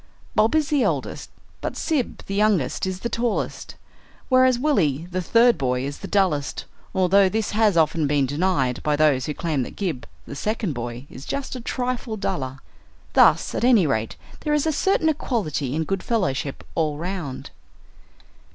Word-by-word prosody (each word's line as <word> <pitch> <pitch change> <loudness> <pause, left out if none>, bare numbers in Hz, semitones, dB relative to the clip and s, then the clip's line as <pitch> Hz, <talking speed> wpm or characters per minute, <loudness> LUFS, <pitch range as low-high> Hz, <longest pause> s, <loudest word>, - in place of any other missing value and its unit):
Bob 220 +7 +3
is 310 -2 +2
the 290 -3 +2
eldest, - - -2 0.3
but - - -4
Sib 300 -7 -2
the 195 - -5
youngest 195 -7 +1
is 185 0 -4
the - - -1
tallest, 235 0 -2 0.5
whereas 255 -1 +5
Willie 175 - +1
the 185 +1 -1
third 230 +6 +4
boy 125 -1 0
is 145 +1 -5
the 195 - -7
dullest, 180 -10 0 0.3
although 190 +1 +4
this 220 +1 -1
has 210 -4 +3
often 160 -1 +2
been 145 -1 +2
denied 140 -3 0
by 150 -1 +1
those 145 -4 +2
who 150 - -3
claim 160 -6 -1
that 125 - -6
Gib 175 -11 -3 0.2
the - - -8
second 210 0 -2
boy 120 +1 -6
is 130 - -10
just 275 - -4
a 250 - -6
trifle 245 -2 -3
duller. 180 -10 -3 0.6
Thus - - +5
at - - -2
any 240 -7 +5
rate 110 -6 -1 0.2
there 300 -1 0
is 295 - +1
a 320 - +2
certain 330 +1 +2
equality 190 - -1
and 160 0 -1
good 195 +1 -2
fellowship 145 - -1
all 155 -3 0
round. 170 -6 -5
185 Hz, 170 wpm, -23 LUFS, 145-230 Hz, 0.6 s, whereas